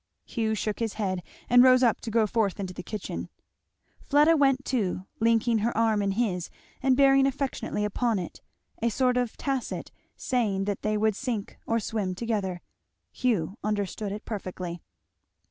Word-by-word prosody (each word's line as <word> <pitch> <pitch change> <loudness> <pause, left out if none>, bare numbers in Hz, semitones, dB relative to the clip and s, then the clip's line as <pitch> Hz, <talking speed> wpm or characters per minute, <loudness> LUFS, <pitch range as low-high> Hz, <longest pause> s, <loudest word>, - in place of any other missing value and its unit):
Hugh 220 -2 -1
shook 215 0 -2
his 225 -3 -1
head, 190 -4 -2 0.3
and 245 0 +7
rose 255 0 +6
up 235 -3 +3
to 230 - -5
go 225 0 +3
forth 210 -2 0
into 190 -2 -4
the 180 - -6
kitchen. 210 +2 -5 0.7
Fleda 295 +3 +4
went 275 -2 +3
too, 195 -7 -1
linking 230 0 +3
her 225 +1 -1
arm 220 -2 +3
in 200 -1 0
his 190 -6 -1 0.3
and 260 -1 +3
bearing 275 -1 +6
affectionately 270 -6 -2
upon 225 +2 0
it, 180 -3 -6 0.4
a 235 - +2
sort 250 +2 +2
of 245 -2 -1
tacit 270 -3 -3 0.2
saying 215 -7 0
that 200 -1 -2
they 215 0 0
would 215 -1 +2
sink 230 -5 -3
or 230 0 +2
swim 205 -4 -2
together. 195 -5 -2 0.5
Hugh 210 -5 -1
understood 205 0 -2
it 210 +1 -6
perfectly. 185 -5 -5
220 Hz, 165 wpm, -27 LUFS, 200-245 Hz, 0.7 s, and